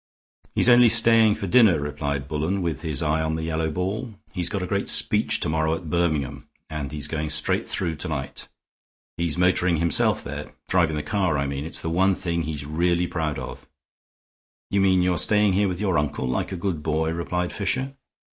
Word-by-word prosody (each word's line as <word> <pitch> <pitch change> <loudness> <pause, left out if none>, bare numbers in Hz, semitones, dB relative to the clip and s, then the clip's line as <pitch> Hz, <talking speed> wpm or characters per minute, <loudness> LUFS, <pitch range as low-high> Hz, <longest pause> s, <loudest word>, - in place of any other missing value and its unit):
"He's - - +6
only 120 -1 +7
staying 115 -1 +5
for 105 - -5
dinner," 95 -4 +5
replied 70 -1 -3
Bullen, 80 +6 -2
with 80 -5 -3
his 80 -1 -2
eye 80 +1 +1
on 80 0 -1
the 80 - -4
yellow 80 0 -1
ball. 100 +8 -3 0.2
"He's 90 -3 -2
got 100 -3 -3
a - - -1
great 100 +2 -2
speech - - +2
to - - -1
morrow 80 0 0
at 80 -2 -8
Birmingham 80 -6 -1 0.2
and 75 -3 -4
he's 75 -1 -3
going 75 0 -3
straight 75 0 0
through 80 -2 -1
to 90 - -4
night. 70 -4 -5 0.7
He's 85 -1 -1
motoring 90 -1 +2
himself 85 -1 +1
there; - - -7
driving 85 -4 +2
the 75 - -3
car, 95 -7 0
I 70 - 0
mean. 70 +1 -4
It's 80 - -5
the 80 - -2
one 95 +3 +3
thing 85 -2 -2
he's 75 -3 -5
really 85 +3 +1
proud 80 -3 -3
of." - - -8 1.0
"You 100 - +2
mean 95 -2 +3
you're 90 -2 +1
staying 105 -2 +3
here 100 +2 +2
with 90 -2 -3
your 95 -6 +1
uncle, 75 -3 -2
like 65 - -2
a - - -3
good 85 -3 -3
boy?" 80 +1 -1
replied 90 +1 -3
Fisher. 130 +7 -2
85 Hz, 200 wpm, -24 LUFS, 75-95 Hz, 1.0 s, only